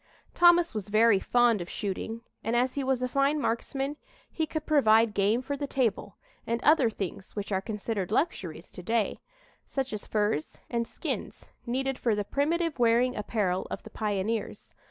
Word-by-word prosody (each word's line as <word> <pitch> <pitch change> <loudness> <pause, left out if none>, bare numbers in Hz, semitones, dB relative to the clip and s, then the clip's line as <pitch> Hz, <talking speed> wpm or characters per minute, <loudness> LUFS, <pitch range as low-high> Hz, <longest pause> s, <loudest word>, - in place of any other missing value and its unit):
Thomas 345 0 +5
was 210 -2 -4
very 215 -1 +5
fond 240 -2 +3
of 175 - -6
shooting 220 +3 -4 0.2
and 230 - 0
as 250 +2 +2
he 280 - -2
was 260 -1 0
a - - +1
fine 275 +3 +2
marksman 275 +3 -2 0.3
he 320 -1 -1
could 310 -1 -4
provide 225 -7 +4
game 210 +5 +2
for 285 +2 -3
the 285 0 -4
table, 220 -7 -1 0.3
and 230 +1 0
other 295 -6 +5
things 195 -3 -6
which 205 0 -4
are 190 -1 +1
considered 210 -2 -3
luxuries 180 - -2
to - - -9
day, 225 +3 0 0.5
such 270 -3 -3
as 210 - -5
furs 210 -7 -1
and 235 -1 0
skins - - -5 0.2
needed 265 +2 -1
for 230 -3 +1
the 205 - -1
primitive 320 - 0
wearing 240 +2 +3
apparel 200 -3 -1
of - - -5
the - - -11
pioneers. 210 +1 -3
230 Hz, 175 wpm, -28 LUFS, 210-270 Hz, 0.5 s, Thomas